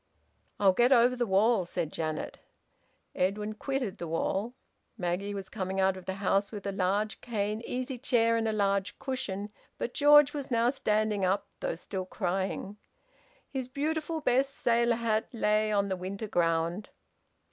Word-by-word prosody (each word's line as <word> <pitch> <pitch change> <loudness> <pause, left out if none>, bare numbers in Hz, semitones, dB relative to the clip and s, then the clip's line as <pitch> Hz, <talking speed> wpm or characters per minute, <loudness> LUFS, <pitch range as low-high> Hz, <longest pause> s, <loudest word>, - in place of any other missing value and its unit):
"I'll 195 -2 +5
get 240 +6 +3
over 250 0 +5
the 240 -1 -1
wall," 205 +2 +3
said 170 -2 -3
Janet. 155 -1 -3 0.7
Edwin 210 +3 -1
quitted 255 -2 -3
the 170 - -4
wall. 195 +8 -1 0.4
Maggie 195 +2 -2
was 195 -1 -5
coming 190 -2 -3
out 190 0 +3
of 185 -1 -10
the 190 - -3
house 195 0 +1
with 205 -3 -7
a 200 - -1
large 200 +3 -1
cane 215 -2 -2
easy 255 0 -3
chair 230 -3 +2
and 225 -1 0
a - - +1
large 200 -2 0
cushion. 210 -6 -4 0.3
But 240 - -3
George 295 0 +6
was 285 -3 -4
now 235 0 +3
standing 215 -5 0
up, 190 +2 +1
though - - -2
still 190 -2 -5
crying. 190 +1 -2 0.7
His 260 -3 -4
beautiful 315 +4 -2
best 270 +1 +2
sailor 235 -1 +2
hat 225 -2 0
lay 215 -1 +2
on 200 -1 +2
the 190 - -1
winter 195 +4 -5
ground. 170 +1 0
210 Hz, 160 wpm, -29 LUFS, 190-240 Hz, 0.7 s, George